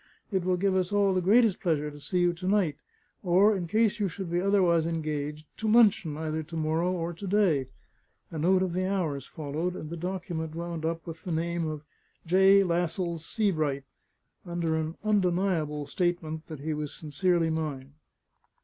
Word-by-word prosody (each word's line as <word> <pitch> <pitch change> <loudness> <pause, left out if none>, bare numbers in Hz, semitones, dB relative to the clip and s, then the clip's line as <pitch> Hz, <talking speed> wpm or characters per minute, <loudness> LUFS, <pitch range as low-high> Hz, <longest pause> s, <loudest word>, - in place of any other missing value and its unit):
It 190 -3 0
will 180 0 +1
give 195 +1 +1
us 185 0 0
all 200 -1 +3
the 185 - +1
greatest 210 +2 +4
pleasure 150 -4 0
to 145 - -11
see 180 +5 -1
you 175 0 +3
to 180 +2 -6
night, 190 -7 +2 0.5
or 195 +3 +4
in 175 -3 -3
case 220 +4 +2
you 205 - +1
should 180 0 -6
be 175 +1 +1
otherwise 180 -4 +3
engaged, 155 -2 -3
to 220 -1 0
luncheon 210 -9 +4
either 160 0 -2
to 165 +2 -9
morrow 160 +3 0
or 170 -1 -2
to 195 +4 -7
day." 180 -10 +2 0.6
A 160 - -5
note 185 +4 +3
of 180 -2 -2
the 185 +1 0
hours 155 -9 -2
followed, 160 +4 -3
and 155 -2 -7
the - - -3
document 170 -2 -4
wound 170 -1 -4
up 165 0 -2
with 165 -1 -8
the 180 - -4
name 170 0 -1
of 155 -1 -5 0.4
"J. 190 +3 +6
Lascelles 170 -1 -1
Sebright," 155 -10 0 0.6
under 170 -2 -1
an 160 +1 -3
undeniable 180 -7 +1
statement 165 -2 -2
that 155 -4 -8
he 155 +2 -2
was 150 -1 -4
sincerely 165 +2 0
mine. 145 -4 -4
170 Hz, 180 wpm, -28 LUFS, 155-185 Hz, 0.6 s, J